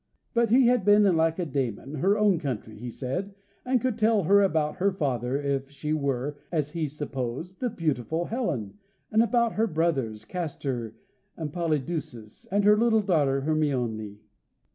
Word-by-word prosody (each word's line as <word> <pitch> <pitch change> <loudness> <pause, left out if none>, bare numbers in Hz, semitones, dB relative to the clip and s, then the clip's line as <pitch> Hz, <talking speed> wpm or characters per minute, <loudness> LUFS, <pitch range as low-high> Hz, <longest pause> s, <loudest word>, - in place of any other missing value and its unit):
But 235 -1 +2
he 250 +3 +5
had 245 -3 +3
been 205 +1 +6
in 190 -4 +4
Lacedaemon, 150 - -1
her 200 +7 +3
own 205 -5 +3
country, 120 -7 -4
he 120 +3 -7
said, 180 - -4 0.3
and 255 0 +2
could 240 -1 -2
tell 215 -2 +3
her 200 +5 +5
about 155 -6 +1
her 200 +2 +2
father, 135 - -1
if 140 -1 -2
she 150 +2 -3
were, 140 -1 -1
as 150 -4 -1
he 160 -2 -2
supposed, 145 +4 -5
the 250 - 0
beautiful 160 - -1
Helen, 170 - -3 0.3
and 220 - +4
about 235 0 +2
her 225 +2 +1
brothers, 135 - -1
Castor 135 -9 -4 0.4
and 155 -3 -5
Polydeuces, 155 -9 -3
and 205 +1 +2
her 210 +1 +6
little 225 -2 +3
daughter, 145 -8 +2
Hermione. 125 -9 -1
155 Hz, 160 wpm, -27 LUFS, 135-200 Hz, 0.4 s, been